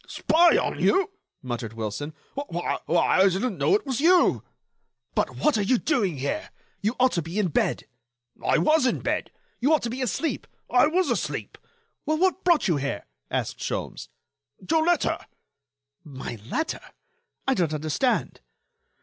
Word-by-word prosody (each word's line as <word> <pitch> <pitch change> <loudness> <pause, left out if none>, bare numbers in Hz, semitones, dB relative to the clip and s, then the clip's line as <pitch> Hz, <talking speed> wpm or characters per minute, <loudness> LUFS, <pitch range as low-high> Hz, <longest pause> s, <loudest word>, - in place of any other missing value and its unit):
"Spy 340 +2 +4
on - - -1
you!" 390 +1 +2 0.3
muttered 120 -3 -4
Wilson, 115 +7 -5 0.2
"why, 225 -12 -3 0.2
I 190 +3 +4
didn't 195 +3 -2
know 400 - +4
it 415 - -1
was 270 -1 -2
you." 350 +2 +4 0.7
"But - - -1
what 300 -8 +2
are - - +2
you 225 +6 +3
doing 210 - 0
here? 140 +2 -3 0.3
You 215 +5 0
ought 255 0 +4
to 170 - 0
be 165 +5 -6
in 205 -4 +2
bed." - - 0 0.6
"I - - +3
was 310 -3 +3
in 245 - 0
bed." - - -1 0.3
"You 275 +6 +2
ought - - -2
to 235 - -2
be 255 +2 -4
asleep." 255 - -2 0.2
"I 250 +4 +5
was 360 +4 +1
asleep." - - -3 0.5
"Well, 310 +1 0
what 375 +2 +1
brought 345 -8 +3
you 170 -5 +2
here?" 140 -7 -3 0.2
asked - - -2
Sholmes. - - -4 0.6
"Your 320 -1 +4
letter." 345 -1 +1 0.8
"My 130 -5 -7
letter? 320 0 -2 0.7
I 270 - +4
don't 175 - 0
understand." 155 - -1
245 Hz, 160 wpm, -25 LUFS, -, 0.8 s, I